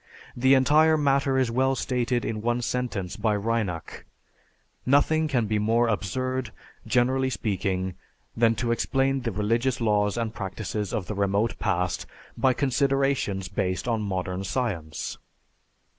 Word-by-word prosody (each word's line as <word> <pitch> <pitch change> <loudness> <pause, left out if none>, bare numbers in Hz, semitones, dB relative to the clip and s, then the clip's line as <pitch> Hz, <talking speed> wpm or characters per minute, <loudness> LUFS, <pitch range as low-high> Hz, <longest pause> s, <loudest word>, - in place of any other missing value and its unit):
The 130 +2 +5
entire 155 +4 +5
matter 140 -2 +2
is 130 -3 +1
well 130 +2 +2
stated 125 -1 -1
in 110 -1 -3
one 120 +2 0
sentence 115 -8 -2
by 110 0 +1
Reinach, 105 -5 -2 0.8
"Nothing 155 +4 +3
can 125 -6 +1
be 105 0 0
more 115 +3 +2
absurd, 130 +4 -2 0.4
generally 130 +2 +2
speaking, 95 -4 -2 0.4
than 115 0 +3
to 120 +1 -1
explain 135 +3 +1
the 120 -2 -2
religious 115 +6 0
laws 105 -2 +1
and 115 -1 -2
practices 105 0 -4
of 100 - -2
the 105 - -4
remote 100 +3 0
past 90 0 -1 0.3
by 130 - +3
considerations 135 -7 0
based 95 +1 -2
on 115 -2 0
modern 95 -2 -3
science." 90 -9 -3
115 Hz, 135 wpm, -26 LUFS, 100-130 Hz, 0.8 s, The